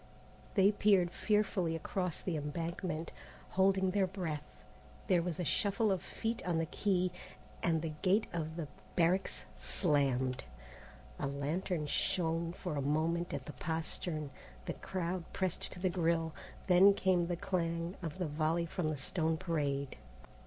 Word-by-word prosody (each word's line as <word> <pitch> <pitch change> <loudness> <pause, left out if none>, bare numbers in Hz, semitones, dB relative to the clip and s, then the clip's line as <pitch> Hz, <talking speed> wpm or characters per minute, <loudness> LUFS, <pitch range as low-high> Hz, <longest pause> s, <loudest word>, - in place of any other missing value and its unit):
They 195 0 +6
peered 195 -4 +4
fearfully 195 -6 +1
across 180 +1 -2
the 180 - -2
embankment, 165 +2 -3 0.4
holding 190 0 +3
their 195 -1 +2
breath. 175 -6 -3 0.6
There 180 -3 +4
was 170 -1 -3
a - - 0
shuffle 200 +5 +2
of 190 - 0
feet 230 +1 -3
on 175 -2 0
the 165 - +1
quay, 185 +1 +1 0.5
and 165 -2 +2
the 160 -2 -2
gate 195 +4 +4
of 160 -2 -3
the 165 -3 -3 0.3
barracks 175 - +2
slammed. 135 - +2 0.8
A - - 0
lantern 150 +4 -1
shone 165 +1 0
for 175 -2 -4
a - - +1
moment 160 +5 +1
at - - -4
the 150 - -7
postern, 160 0 -3 0.3
the - - -2
crowd 180 -1 -3
pressed 185 -2 -1
to 180 - -9
the 185 0 +1
grille, 165 -2 +1 0.3
then 195 +2 +7
came 180 -3 +2
the 175 - 0
clang 170 0 -1
of 165 0 -4
the 180 - -1
volley 160 +3 +1
from 165 -1 -1
the 155 - -2
stone 160 +3 0
parade. 145 -6 -1
170 Hz, 150 wpm, -34 LUFS, 155-185 Hz, 0.8 s, then